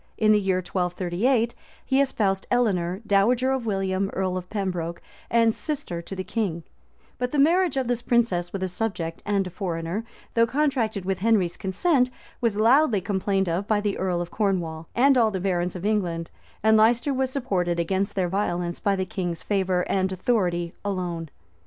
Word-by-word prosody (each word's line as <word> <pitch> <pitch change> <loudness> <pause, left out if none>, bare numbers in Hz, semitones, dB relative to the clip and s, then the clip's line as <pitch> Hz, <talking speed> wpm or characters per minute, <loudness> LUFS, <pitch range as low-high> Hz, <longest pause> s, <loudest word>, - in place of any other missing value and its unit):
In 215 -1 +4
the 210 - +5
year 190 -2 0
1238, 185 +7 0 0.3
he 265 +1 +3
espoused 200 -8 0
Eleanor, 190 -6 +1
dowager 235 +6 +3
of 260 -3 -1
William, 195 -1 0
earl 185 -1 -1
of 180 -1 -5
Pembroke, 180 -5 -3 0.3
and 230 -1 +4
sister 275 - -4
to 195 - -8
the 185 - -3
king;[*] 185 -7 -2 0.6
but 250 0 0
the 295 - -2
marriage 330 +1 +3
of 260 -2 0
this 245 -1 0
princess 230 -8 +1
with 195 -1 -3
a - - +1
subject 180 -4 -3
and 200 -2 +1
a 185 - -6
foreigner, 175 +1 -3 0.3
though 230 0 +4
contracted 245 -8 0
with 190 -1 -1
Henry's 195 -5 +2
consent, 250 - +1 0.3
was 230 -4 +1
loudly 235 +1 +4
complained 195 0 0
of 175 +4 -1
by 215 -1 +2
the 205 -1 -1
earl 180 -2 0
of 175 0 -6
Cornwall 170 -6 -1
and 265 +1 +5
all 225 -2 +4
the 190 -3 -3
barons 180 -1 -1
of 180 +1 -5
England; 175 -6 -1 0.3
and 220 0 +5
Leicester 235 +5 +3
was 265 0 0
supported 190 -11 -1
against 190 +4 -1
their 185 -2 +1
violence 175 -2 -1
by 200 -1 +1
the 190 -1 -1
king's 175 -3 -4
favor 190 -3 0
and 190 -1 0
authority 180 -4 0
alone. 175 -5 -3
195 Hz, 175 wpm, -25 LUFS, 180-230 Hz, 0.6 s, the